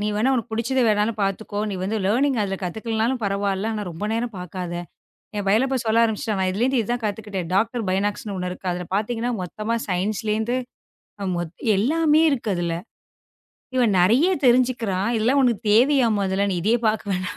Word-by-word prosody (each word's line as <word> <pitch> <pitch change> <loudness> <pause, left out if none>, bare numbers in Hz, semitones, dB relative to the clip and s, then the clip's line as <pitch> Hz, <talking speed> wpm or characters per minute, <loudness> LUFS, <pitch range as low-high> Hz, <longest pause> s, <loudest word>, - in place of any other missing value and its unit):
நீ 210 - -1
வேணா 220 +6 +2
உனக்குப் 230 -3 -3
புடிச்சதை 245 +4 +1
வேணாலும் 210 +1 +1
பாத்துக்கோ. 205 +1 -2
நீ 195 - -3
வந்து 205 +4 -1
லேர்னிங் 255 +5 +2
அதுல 195 -1 -2
கத்துக்கலைன்னாலும் 225 +6 -1
பரவாயில்ல. 200 +1 -1
ஆனா 210 - -3
ரொம்ப 170 +5 -4
நேரம் 230 0 -2
பாக்காத. 180 -1 -6 0.6
என் 205 - -2
பையன்ல்லா 220 +7 +3
இப்போ 265 -1 0
சொல்ல 225 +1 +4
ஆரம்பிச்சிட்டான். 215 -3 -1
இதுல 200 +5 -1
இருந்து 260 -2 +2
இதைக் 240 +2 -3
கத்துக்கிட்டேன். 200 -4 -4
டாக்டர் 225 +3 +1
பைனாக்ஸ்ன்னு 200 +1 -1
ஒண்ணு 180 0 -3
இருக்கு. 185 +1 -5
அதுல 180 0 -5
பாத்தீங்கன்னா 230 +3 -1
மொத்தமா 215 +6 -3
சயின்ஸ்ல 205 +4 -1
இருந்து 235 +3 -1 1.2
எல்லாமே 305 +8 +3
இருக்கு 245 -6 -2
அதுல. 170 -1 -1 1.0
இவன் 240 -5 +3
நிறைய 230 - +4 0.2
தெரிஞ்சுக்கிறான். 240 -6 +2
இதெல்லாம் 240 +6 +2
உனக்குத் 235 -4 +1
தேவையா? 255 +2 +5
முதல்ல 195 +1 0
நீ - - -1
இதையே 225 +4 +3
பாக்க 215 0 0
வேணாம் 180 0 -3
215 Hz, 165 wpm, -23 LUFS, 195-240 Hz, 1.2 s, தேவையா